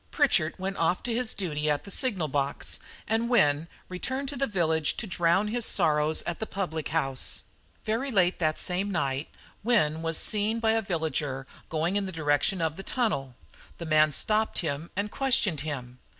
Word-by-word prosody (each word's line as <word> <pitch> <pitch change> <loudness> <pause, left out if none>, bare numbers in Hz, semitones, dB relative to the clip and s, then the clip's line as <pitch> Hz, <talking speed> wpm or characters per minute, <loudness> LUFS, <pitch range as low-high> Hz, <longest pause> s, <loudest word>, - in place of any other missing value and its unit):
Pritchard 220 - +2
went 195 +1 -3
off 170 +2 +1
to 240 - -1
his 240 -1 0
duty 155 -5 -1
at 145 -1 +1
the 200 - -9
signal 195 -12 0
box 140 0 -1 0.3
and 225 +2 +1
Wynne 150 -9 +3 0.2
returned 260 +9 -3
to 285 - -4
the 275 +1 0
village 160 -6 +1
to - - -2
drown 180 +2 +2
his 240 +2 -1
sorrows 155 -6 +2
at 170 - -4
the 220 - -3
public 160 -6 -3
house. 135 -4 -1 0.4
"Very 230 +6 0
late 185 -6 +2
that 155 -2 +1
same 190 +2 0
night 140 -6 -1 0.3
Wynne 160 -10 +2
was 165 -1 0
seen 215 +1 +2
by 225 -1 +3
a 225 0 +2
villager 155 -7 -2 0.2
going 165 +5 0
in 200 -1 -1
the - - -4
direction 160 +3 +1
of 160 0 -1
the - - -5
tunnel. 195 - -1 0.4
The 170 - -6
man 155 -1 +4
stopped 215 +8 +1
him 155 0 -2
and 200 +2 -2
questioned 245 - +2
him. 130 -5 -5
175 Hz, 180 wpm, -28 LUFS, 155-215 Hz, 0.4 s, man